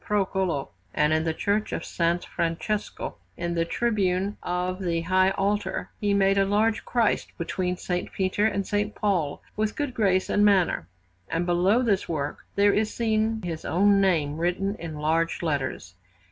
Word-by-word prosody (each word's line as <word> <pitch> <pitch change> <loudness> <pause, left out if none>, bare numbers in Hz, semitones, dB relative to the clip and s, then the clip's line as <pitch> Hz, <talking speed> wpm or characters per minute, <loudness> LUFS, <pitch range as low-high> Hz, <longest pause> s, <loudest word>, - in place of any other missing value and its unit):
Procolo; 190 -7 0 0.3
and 150 +1 +3
in 160 +1 +1
the 160 - +1
Church 205 +4 0
of - - -3
S. 170 +1 0
Francesco, 170 +5 -3 0.2
in 170 0 -2
the 165 -1 +1
tribune 200 -2 0
of 180 +1 -2
the 170 -2 0
high 185 +2 +3
altar, 200 +2 -1
he 205 -1 0
made 195 0 +3
a 195 - +4
large 215 +3 +1
Christ 235 -3 0
between 180 +1 -2
S. 180 - -8 0.2
Peter 195 +2 +1
and 200 -2 -1
S. 205 0 0
Paul, 180 -9 -1
with 215 0 -1
good 290 -4 -2
grace 190 -5 +2
and 205 - +2
manner, 190 - +3 0.4
and 165 +1 -1
below 180 +7 +3
this 205 -5 +1
work 150 -3 -2 0.2
there 200 0 +4
is 215 0 +1
seen 220 -1 0
his 165 -3 -4
own 200 +2 +3
name 155 -6 +1
written 180 +4 0
in 160 -2 -6
large 160 +3 0
letters. 135 - -2
190 Hz, 165 wpm, -26 LUFS, 170-205 Hz, 0.4 s, a